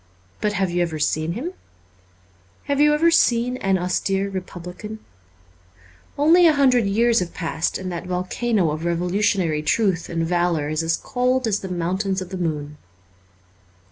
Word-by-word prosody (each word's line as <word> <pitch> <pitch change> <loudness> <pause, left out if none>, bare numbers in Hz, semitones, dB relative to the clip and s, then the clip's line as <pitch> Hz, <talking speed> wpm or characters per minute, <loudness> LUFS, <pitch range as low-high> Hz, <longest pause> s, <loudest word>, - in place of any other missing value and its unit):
But 210 -1 0
have 190 -3 0
you 175 0 0
ever 165 -2 -1
seen 155 +2 0
him? 300 - -5 1.1
Have 285 0 0
you 300 0 +6
ever 335 +3 +3
seen 245 -4 +2
an 195 -5 +1
austere 195 +2 -1
republican? 185 +3 -7 1.2
Only 335 +4 +6
a 315 - +5
hundred 255 -6 +3
years 230 +3 +3
have 175 -1 -4
passed 165 -1 -2
and 185 -1 -5
that 175 +1 -5
volcano 185 +1 0
of 155 +2 -4
revolutionary 175 -1 0
truth 180 +1 0
and 165 -1 -1
valour 175 -3 0
is 155 +1 -1
as 165 0 0
cold 255 +1 0
as 210 -2 0
the 190 - -7
mountains 185 +3 -1
of 185 -1 -6
the 190 - -5
moon. 150 -4 -3
185 Hz, 155 wpm, -22 LUFS, 170-230 Hz, 1.2 s, you